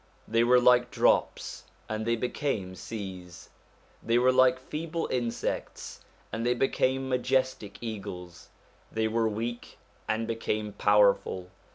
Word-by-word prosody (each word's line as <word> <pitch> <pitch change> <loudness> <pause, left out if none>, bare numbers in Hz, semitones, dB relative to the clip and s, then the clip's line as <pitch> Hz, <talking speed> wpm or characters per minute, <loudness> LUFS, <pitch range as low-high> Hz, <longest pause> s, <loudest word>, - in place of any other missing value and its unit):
They 115 +1 +3
were 125 +1 +6
like 125 0 +5
drops - - +1 0.2
and 110 +1 -3
they 115 - +3
became 115 -5 -2
seas, 95 -2 -8 0.5
they 115 +1 +2
were 125 +1 +5
like 130 0 +5
feeble 160 +5 -4
insects 120 -2 -3 0.3
and 115 - -2
they 120 +1 +2
became 135 +1 +1
majestic 130 -4 0
eagles, 90 -6 -7 0.4
they 110 0 0
were 115 0 +1
weak 115 +3 -5 0.3
and 110 +1 0
became 110 -2 -2
powerful. 100 -3 +3
115 Hz, 125 wpm, -28 LUFS, 105-125 Hz, 0.5 s, were